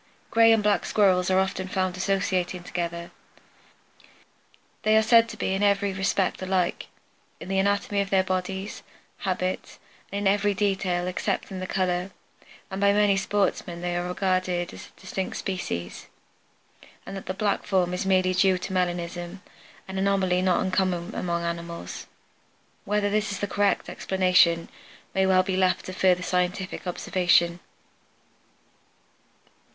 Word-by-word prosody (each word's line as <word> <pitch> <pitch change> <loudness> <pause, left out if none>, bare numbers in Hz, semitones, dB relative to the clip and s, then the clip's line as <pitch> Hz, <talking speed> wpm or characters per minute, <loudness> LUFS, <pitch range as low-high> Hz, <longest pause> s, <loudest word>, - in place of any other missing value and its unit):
Gray 225 0 +6
and 225 -2 +3
black 205 -3 +2
Squirrels 185 -3 +3
are 185 - +3
often 190 0 0
found 185 -1 -1
associating 185 -2 -1
together. 170 -1 -4 1.7
They 215 0 +4
are 220 - +4
said 230 +1 +5
to - - -8
be 190 - -1
in 195 - -1
every 200 -1 +2
respect 190 0 0
alike, 185 -2 -1 0.5
in - - -9
the 195 0 +1
anatomy 200 +1 +1
of 195 - -3
their 190 -1 +3
bodies, 190 +2 -3 0.4
habits, 185 -1 -3 0.3
and 200 - -3
in 200 -1 0
every 205 0 0
detail 190 -3 0
excepting 185 +1 -2
the 185 - -4
color, 180 0 -1 0.6
and 190 +1 -4
by 200 0 +5
many 205 -1 +4
sportsmen 195 -3 -1
they 175 0 -2
are 175 0 -2
regarded 185 -1 -1
as - - -10
distinct 190 0 -4
species, 90 - -4 1.0
and 195 - -7
that 195 - -8
the 185 - -3
black 205 0 0
form 180 -3 +1
is 180 - -2
merely 185 -1 +2
due 185 0 +3
to 190 - -6
melanism, 175 0 -2 0.4
an 190 0 -4
anomaly 190 -2 +2
not 185 -1 +2
uncommon 185 -2 -1
among 170 -1 -2
animals. 170 0 -5 0.8
Whether 205 -1 0
this 215 0 0
be 200 - -6
the 200 - -10
correct 205 0 +1
explanation 180 -3 +2 0.5
may 190 0 +2
well 185 -1 +4
be 190 0 -2
left 185 -1 +1
to 185 - -6
further 185 -1 +2
scientific 180 +1 -2
observation. 175 -1 +2
185 Hz, 145 wpm, -26 LUFS, 180-195 Hz, 1.7 s, Gray